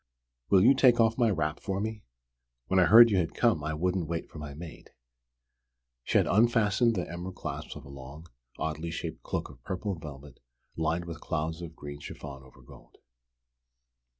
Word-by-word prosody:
Will 95 -1 +6
you 130 +5 +7
take 125 -3 +5
off 115 +1 +3
my 120 -2 +4
wrap 80 -5 -1
for 95 -1 -3
me? 110 +1 -3 0.6
When 95 +8 +2
I 90 - +6
heard 115 +3 +9
you 100 - +3
had 85 -3 -1
come 115 -11 +2
I 75 0 -2
wouldn't 90 +1 -1
wait 85 0 -3
for 80 - -9
my 75 -2 -7
maid." 80 +1 -10 1.1
She - - +2
had - - +4
unfastened 115 +1 +3
the 90 - -2
emerald 90 +2 -6
clasps - - -6
of - - -10
a - - -12
long, 70 +3 -10 0.3
oddly 80 +1 -3
shaped 80 - -5
cloak - - -3
of - - -18
purple 95 +2 -3
velvet 75 -5 -10 0.4
lined 80 +2 -1
with 85 -1 -8
clouds 80 +1 -3
of 80 -2 -8
green 70 -1 -8
chiffon 70 -1 -9
over 65 -1 -18
gold. - - -17
85 Hz, 180 wpm, -29 LUFS, 75-105 Hz, 1.1 s, heard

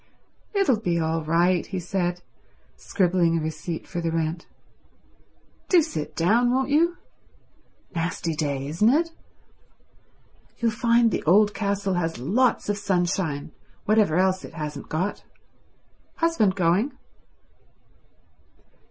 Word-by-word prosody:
"It'll 330 - +3
be 175 -5 0
all 160 0 -1
right," 170 +3 +2
he 190 - -5
said, 180 0 -2 0.5
scribbling 175 -3 +1
a - - -1
receipt 160 +1 -5
for 175 - -4
the 165 -1 -1
rent. 165 +1 -2 1.2
"Do 350 -4 +5
sit 155 - -5
down, 225 +9 +3
won't 265 +2 0
you? 335 +4 +3 1.0
Nasty 170 -1 -2
day, 140 -3 -2
isn't 170 +9 +2
it? 325 +6 +2 1.5
You'll 230 -1 +1
find 230 +1 +3
the - - -1
old 205 +5 +5
castle 200 -1 -1
has 165 -2 -1
lots 225 - +1
of 205 0 -1
sunshine, 175 -6 -1 0.3
whatever 210 -6 +3
else 185 0 +2
it - - -10
hasn't 150 -2 -6
got. 180 +6 -2 0.9
Husband 330 - +2
going?" 190 - +1
185 Hz, 115 wpm, -24 LUFS, 165-220 Hz, 1.5 s, Do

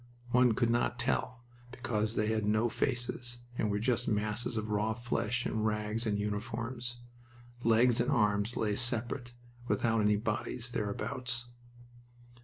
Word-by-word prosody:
One 125 -1 +5
could 115 +1 +2
not 120 +1 +1
tell, 120 0 -1 0.3
because 115 -3 -2
they 105 - +2
had 110 -1 +1
no 110 +3 +2
faces, 125 -1 -1 0.2
and 110 - 0
were 105 - +1
just 115 +2 +1
masses 105 +2 -1
of 110 0 -2
raw 105 +1 +1
flesh 120 0 -1
in 110 - -1
rags 105 +1 -1
and 105 -1 +1
uniforms. 115 +4 -3 0.7
Legs 115 +1 +4
and 120 - 0
arms 105 +1 +2
lay 105 -2 +1
separate, 120 +1 -1 0.3
without 115 -3 +2
any 105 0 +4
bodies 120 +2 -2
thereabouts. 120 +4 -2
115 Hz, 140 wpm, -32 LUFS, 105-120 Hz, 0.7 s, One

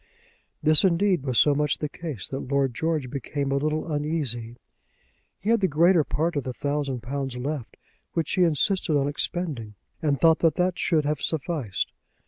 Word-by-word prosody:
This, 155 0 +6
indeed, 185 -1 +3
was 130 -3 -1
so 145 - +5
much 150 0 +1
the 150 - -2
case 145 - -6
that 135 - -3
Lord 140 -2 +1
George 155 -1 -1
became 140 0 -3
a 140 - +2
little 155 +3 -1
uneasy. 145 -7 -1 0.8
He 215 - -1
had 230 - +4
the 190 - +4
greater 170 +2 +4
part 160 +4 -1
of 145 - -1
the 130 - -4
thousand 140 -3 -2
pounds 135 0 -3
left, 140 0 -4 0.4
which 165 -2 -1
he 185 - +1
insisted 170 0 +2
on 140 0 +1
expending, 145 - -3 0.3
and 145 -4 +1
thought 165 -1 +5
that 160 -2 +3
that 180 0 0
should 155 -4 +2
have 150 0 -1
sufficed. 150 - -2
150 Hz, 175 wpm, -25 LUFS, 135-165 Hz, 0.8 s, This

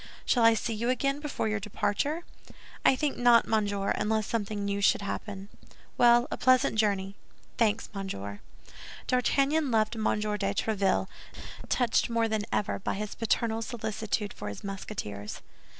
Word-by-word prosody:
"Shall 240 - +3
I 230 0 +7
see 225 +1 -2
you 230 +3 -1
again 275 +3 0
before 295 -6 -2
your 215 0 0
departure?" 280 - -1 0.6
"I - - +5
think 285 +1 -1
not, 240 -1 +5
monsieur, 205 -2 0
unless 215 0 0
something 205 -2 -2
new 200 0 -1
should 200 - +3
happen." 200 -1 -5 0.5
"Well, 240 0 +5
a - - -2
pleasant 255 -3 +3
journey." 200 -2 +1 0.4
"Thanks, 220 -1 +2
monsieur." 100 - -5 0.7
D'Artagnan 275 +4 +2
left 220 0 +1
M. 220 - -4
de - - +4 0.5
Tréville, 200 -3 +1 0.6
touched 245 -2 +2
more 230 -1 +1
than 215 -1 -1
ever 205 - -1
by - - -2
his 210 +1 -4
paternal 225 0 0
solicitude 220 -2 -3
for 105 - -6
his 100 - -8
Musketeers. 185 - -6
220 Hz, 150 wpm, -29 LUFS, 200-235 Hz, 0.7 s, I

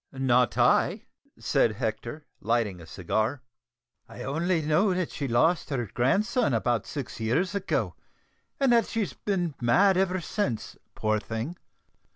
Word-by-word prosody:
"Not 125 -2 +2
I," - - +3 0.3
said 110 - +2
Hector, 115 +6 -4
lighting 110 -5 0
a 80 - -12
cigar. 110 - -2 0.7
"I 120 - -8
only 165 +5 0
know 175 +6 +2
that 180 -2 -2
she 140 - -3
lost 155 +9 +2
her 130 -5 -1
grandson 205 - +2
about 115 -1 0
six 135 -6 -6
years 130 - 0
ago, 200 -1 -1 0.7
and 270 -3 +3
that 230 -1 +4
she's 225 -4 -2
been 180 -6 -2
mad 185 +11 +4
ever 185 0 +1
since, 155 - -3 0.2
poor 110 0 0
thing." 115 +10 -5
140 Hz, 140 wpm, -27 LUFS, 115-185 Hz, 0.7 s, that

